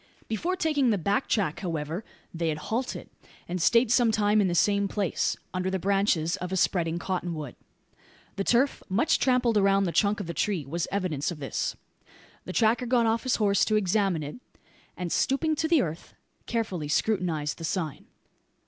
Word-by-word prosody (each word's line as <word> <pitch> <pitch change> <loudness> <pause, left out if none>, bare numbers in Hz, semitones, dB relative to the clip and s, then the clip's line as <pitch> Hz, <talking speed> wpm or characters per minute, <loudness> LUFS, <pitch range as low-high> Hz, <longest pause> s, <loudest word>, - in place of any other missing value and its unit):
Before 335 - -1
taking 300 -7 +1
the 210 - +2
back 200 - 0
track, 190 -9 0
however, 165 0 -3 0.3
they 165 -1 -1
had 150 - -2
halted, 230 +11 -4 0.4
and 180 0 -3
stayed 230 +5 +4
some 240 -2 +4
time 210 0 +3
in 195 - +2
the 175 - -1
same 200 +2 +3
place 195 -2 -1 0.2
under 185 0 -1
the 190 - -1
branches 190 -3 +1
of 180 +1 -5
a 190 - 0
spreading 170 -2 +1
cottonwood. 175 -7 -4 0.8
The 195 - -1
turf, 245 +6 +2
much 215 - +2
trampled 250 -4 +2
around 195 0 +4
the 180 - 0
trunk 205 +3 +2
of 205 - -4
the 170 - -5
tree, 185 -7 -1
was 165 +5 -3
evidence 180 -8 -1
of 175 - -5
this. 140 -2 -3 0.7
The 185 - -6
tracker 235 +3 +2
got 240 -1 +3
off 225 0 +1
his 255 - +1
horse 200 -3 +2
to 215 - +1
examine 195 -4 +1
it; 145 +8 -7 0.6
and, 180 -2 -4
stooping 310 +4 +1
to 320 - 0
the 325 -3 +4
earth, 165 0 -7 0.3
carefully 205 -10 -2
scrutinised 160 -4 0
the - - -7
sign. 160 -3 -3
195 Hz, 180 wpm, -27 LUFS, 170-225 Hz, 0.8 s, stayed